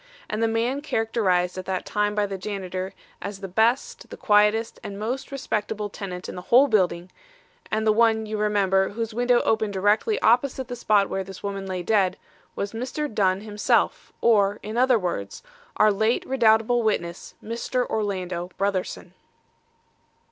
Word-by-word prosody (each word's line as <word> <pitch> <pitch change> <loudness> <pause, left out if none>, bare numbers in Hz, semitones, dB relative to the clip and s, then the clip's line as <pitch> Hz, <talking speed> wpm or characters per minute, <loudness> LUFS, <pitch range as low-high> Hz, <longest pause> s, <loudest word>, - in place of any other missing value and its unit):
And 215 - -3
the 225 - +3
man 235 +5 0
characterised 200 -9 0
at 185 - -7
that 190 -1 -3
time 210 0 0
by 210 -1 +2
the 195 -1 -4
janitor 190 -1 -5 0.3
as 200 -1 -6
the 195 - -6
best, 225 +7 0
the - - -9
quietest 210 +2 +2
and 200 - -6
most 240 +7 -4
respectable 215 -5 -3
tenant 185 -3 -6
in - - -6
the 180 - -7
whole 260 +4 +7
building, 185 -6 +1 0.6
and 220 0 -1
the 215 - +5
one 220 0 +3
you 215 0 -4
remember 195 -2 +2
whose 225 +1 -4
window 245 +1 +3
opened 220 -2 0
directly 205 - +2
opposite 255 +2 +2
the 245 - -4
spot 205 -4 +2
where 195 - -3
this 190 0 -11
woman 195 -1 -4
lay 185 -1 -3
dead, 190 -2 +2 0.4
was 200 +1 -3
Mr. 255 +4 -4
Dunn 190 -2 +2
himself, 210 0 0
or, 205 -3 +3
in 215 +2 -5
other 250 0 +4
words, 175 - -4 0.3
our 215 0 +5
late 220 +4 +1
redoubtable 235 -2 +3
witness, 175 -6 -2
Mr. 235 +2 -2
Orlando 185 -4 -3
Brotherson." 190 -2 -2
210 Hz, 160 wpm, -24 LUFS, 195-225 Hz, 0.6 s, whole